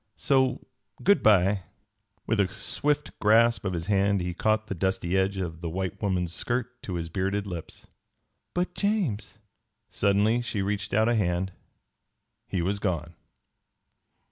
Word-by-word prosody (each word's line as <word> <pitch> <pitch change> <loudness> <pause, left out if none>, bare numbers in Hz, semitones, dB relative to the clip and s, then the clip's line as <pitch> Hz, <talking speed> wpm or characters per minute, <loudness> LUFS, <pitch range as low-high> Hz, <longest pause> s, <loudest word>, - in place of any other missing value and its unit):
So 130 -2 +2 0.4
good 200 +2 +5
by." 100 -1 +4 0.6
With 110 -1 0
a 100 - +4
swift 140 +10 -2
grasp 115 +2 +4
of 95 - -1
his 85 -1 -3
hand 100 0 +2
he 90 0 -2
caught 110 +3 +1
the 105 - -4
dusty 95 0 -1
edge 95 +1 +1
of 85 -3 -4
the 85 - -3
white 95 +3 -4
woman's 90 -4 0
skirt 125 +3 -3
to 95 - -5
his 85 -1 -3
bearded 95 +4 -1
lips. 85 -5 -7 0.7
"But, 180 +1 0
James 160 - -1 0.3
" - - -52
Suddenly 105 +4 +2
she 110 -4 -2
reached 105 0 -2
out 110 +1 +4
a 120 - +3
hand. 95 -3 0 1.0
He 90 -3 -1
was 100 +3 0
gone. 85 -4 -2
100 Hz, 150 wpm, -27 LUFS, 95-110 Hz, 1.0 s, good